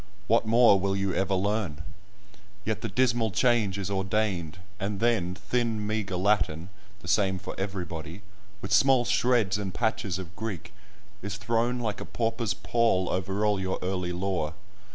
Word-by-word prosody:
What 115 +1 +2
more 115 -3 +6
will 95 +1 0
you 95 -1 0
ever 95 0 +1
learn? 95 -6 -1 0.8
Yet 110 -2 -1
the - - -3
dismal 120 -3 +2
change 110 -3 +2
is 100 0 -3
ordained, 95 -4 -1 0.2
and 100 0 -2
then, 105 -6 +1
thin 110 +3 -1
meagre 105 -3 -2
Latin 90 -4 +1 0.3
(the 90 - -11
same 95 -1 +2
for - - -6
everybody), 90 -2 -5 0.4
with 100 - -5
small 130 +3 +5
shreds 115 -7 +2
and 100 -2 -3
patches 110 -5 0
of 90 -2 -8
Greek, 110 -6 -5 0.5
is 100 -1 -4
thrown 115 +4 0
like 110 -4 -3
a - - -5
pauper's 115 -4 -1
pall 115 -6 +1
over 95 +3 -1
all 105 -2 +2
your 95 0 -1
early 90 -1 -2
lore. 90 -3 -2
100 Hz, 155 wpm, -28 LUFS, 95-110 Hz, 0.8 s, more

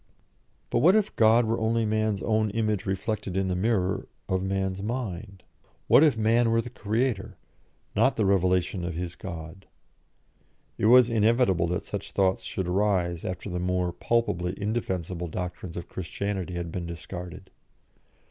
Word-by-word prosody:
But - - +2
what 175 - +6
if 215 -1 +1
God 115 +1 +5
were 115 +1 0
only 115 0 +1
man's 110 -2 0
own 110 -1 +1
image 105 -2 -1
reflected 95 0 -2
in 95 -1 0
the 90 - 0
mirror 95 -1 0 0.2
of 95 0 0
man's 95 0 -2
mind? 100 -4 -5 0.4
What - - +6
if 150 -7 +4
man 115 +2 +3
were 115 0 +3
the 115 +1 -4
creator, 110 -1 -2 0.6
not - - +3
the 110 - +1
revelation 90 -1 +2
of 85 -1 -3
his 90 0 -4
God? 85 +1 -8 1.1
It 105 - +3
was 125 0 +7
inevitable 110 -6 +3
that 90 +3 -2
such 100 -1 -6
thoughts 95 -1 +2
should 95 -2 -3
arise 90 -3 +1
after 90 +2 -5
the 90 -2 -3
more 90 -1 0
palpably 90 -7 -1
indefensible 95 -5 -2
doctrines 90 +1 -5
of 85 - -6
Christianity 95 0 -4
had 85 -1 -4
been 85 -1 -4
discarded. 90 +2 -8
95 Hz, 155 wpm, -27 LUFS, 90-110 Hz, 1.1 s, was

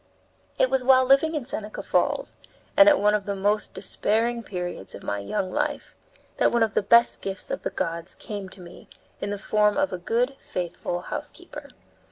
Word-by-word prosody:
It - - +3
was 265 -1 +1
while 260 0 +6
living 275 +5 +4
in 290 -5 -3
Seneca 215 -5 -5
Falls, - - 0 0.4
and 300 0 +8
at 295 - +4
one 210 +1 +3
of 210 -2 0
the 200 - -1
most 205 +2 0
despairing 230 +3 0
periods 180 - -5
of - - -11
my 100 - -2
young 100 - -3
life, - - -2 0.4
that - - +3
one 235 -1 +3
of 220 - 0
the - - +2
best 235 +4 +4
gifts 195 -1 -5
of - - -3
the - - -2
gods 170 -2 -4
came 200 -3 -7
to 185 - -12
me 175 0 -13 0.3
in 200 - -2
the 205 - -2
form 210 +1 +2
of 290 -7 +1
a 180 - -3
good, 240 +9 0
faithful 175 0 -4
housekeeper. - - -8
210 Hz, 195 wpm, -25 LUFS, 185-245 Hz, 0.4 s, and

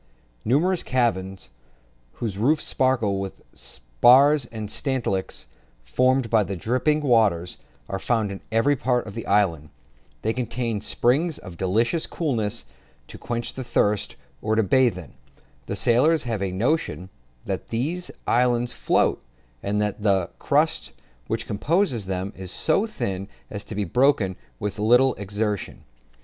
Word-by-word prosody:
Numerous 165 - +2
caverns, 95 - -1 0.6
whose 110 -5 -4
roofs 150 +7 +2
sparkle 120 -7 +1
with 95 -1 -5
the - - -26
spars 120 - +4
and 110 -3 -6
stalactites 120 -9 -2 0.4
formed 130 - +2
by 110 -1 +3
the 100 0 -4
dripping 130 - +1
water, 110 - +3 0.4
are 95 - -3
found 110 -1 0
in 100 - -7
every 115 +6 +3
part 125 -1 0
of 105 - -8
the 115 - -6
islands. 85 -7 +1 0.5
They 110 - +1
contain 120 -3 -2
springs 145 +9 +1
of 90 -4 -10
delicious 115 - 0
coolness, 115 -9 -1 0.4
to - - -10
quench 120 0 -3
the 130 - -5
thirst, 105 -4 0 0.3
or 110 +1 0
to 110 - +3
bathe 120 0 +3
in. 85 -6 -10 0.5
The - - -3
sailors 150 +7 +3
have 115 -5 -3
a 95 -1 -1
notion 95 - -1 0.3
that - - -4
these 160 +10 -2 0.2
islands 120 0 +2
float, - - +1 0.4
and 105 +1 -1
that 105 0 -3
the 95 -4 +1
crust - - +1 0.3
which - - -2
composes 130 - 0
them 95 +2 -3
is 95 -1 -7
so 160 - +1
thin 100 - -4 0.2
as 100 0 -4
to 110 - -7
be 105 - 0
broken 110 - +2 0.2
with 105 +1 -4
little 125 +5 +4
exertion. 105 0 -3
115 Hz, 145 wpm, -24 LUFS, 100-130 Hz, 0.6 s, spars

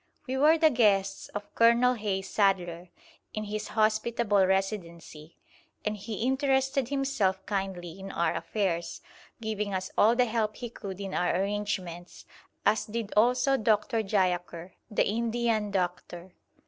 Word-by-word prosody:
We 260 -1 -3
were 300 +4 +5
the 315 -1 +5
guests 200 -5 +2
of 205 0 -8
Colonel 235 +2 +5
Hayes 200 -4 -3
Sadler, 180 -4 0 0.5
in 215 - -2
his 210 0 -4
hospitable 215 -2 +2
Residency, 170 -5 -3 0.5
and 210 0 0
he 210 +1 -5
interested 265 -1 +1
himself 270 -9 0
kindly 190 -3 -4
in 195 0 -7
our 170 -1 0
affairs, 170 -5 -2 0.4
giving 210 -2 -2
us 185 0 -3
all 225 +3 +5
the 250 0 +4
help 220 -2 -1
he 240 -2 -7
could 195 -4 -7
in 195 -1 -5
our 175 - +1
arrangements, 190 -4 -4 0.4
as 215 0 +3
did 220 -1 -4
also 250 +5 +3
Dr. 220 0 +1
Jayaker, 180 -3 -1 0.2
the 210 - +1
Indian 230 -1 0
doctor. 180 -1 -3
210 Hz, 135 wpm, -28 LUFS, 190-230 Hz, 0.5 s, were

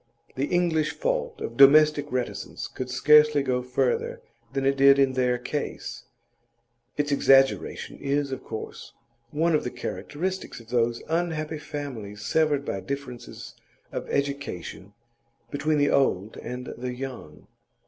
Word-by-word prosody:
The 135 +2 -1
English 170 -3 +1
fault - - -2
of 115 - -5
domestic 145 +1 +6
reticence 125 -1 -3
could 130 -1 -6
scarcely 150 +3 +5
go 125 -2 0
further 125 +1 -1 0.3
than 135 0 -2
it 135 0 +3
did 140 0 +6
in 135 -1 +3
their 125 -1 +1
case; 145 +4 -5 0.9
its 145 0 0
exaggeration 135 -1 +3
is, 140 0 -1
of 130 - -5
course, 110 - -7 0.4
one 160 +5 +1
of 150 - +2
the - - -2
characteristics 185 +8 -4
of 115 -1 -16
those 120 -1 0
unhappy 160 -2 -1
families 115 -10 -7
severed 150 -3 +2
by 95 - -2
differences 125 +3 -7 0.4
of - - -5
education 140 -9 -3 0.6
between 150 +2 0
the 145 0 +3
old 110 -7 +1
and 125 +1 -6
young. 125 - -6
140 Hz, 130 wpm, -26 LUFS, 125-150 Hz, 0.9 s, domestic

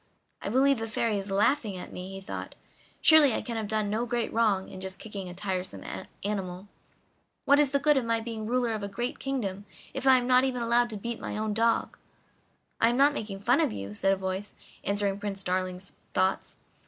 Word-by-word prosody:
"I - - -3
believe 270 +2 +4
the 225 - -3
Fairy 220 -1 0
is 195 +1 -6
laughing 205 +1 +2
at 180 - -8
me," 180 +1 -6
he 195 0 -7
thought. 190 - -6 0.5
"Surely 305 -6 +7
I - - -2
can 235 - -4
have 220 -2 -2
done 215 -1 0
no 230 +3 -1
great 235 -1 -1
wrong 210 -4 +2
in 185 - -9
just 190 0 -6
kicking 200 -4 -7
a 175 - -9
tiresome 185 -1 -3 0.4
animal! 190 -2 -3 0.8
What 285 +1 +6
is 295 -2 +4
the 280 - +2
good 295 +1 +4
of 255 - +1
my 230 0 +1
being 225 -1 -5
ruler 245 -1 +1
of 215 - -3
a 200 - -3
great 240 +5 -3
kingdom 205 -8 -3 0.3
if 270 0 -2
I 260 -1 +8
am 245 - -1
not 255 0 +5
even 250 -2 0
allowed 240 +1 +3
to 215 - -5
beat 235 +3 -4
my - - -4
own 215 0 -1
dog?" 230 +2 +1 0.8
"I 230 - +5
am 240 - 0
not 285 +2 +5
making 205 -7 -5
fun - - +3
of - - +2
you," 100 0 -6
said 195 - +2
a - - +4
voice, 190 +2 -4 0.3
answering 200 0 0
Prince 200 -1 -4
Darling's 185 0 -2 0.2
thoughts. 190 +1 0
215 Hz, 215 wpm, -28 LUFS, 195-240 Hz, 0.8 s, I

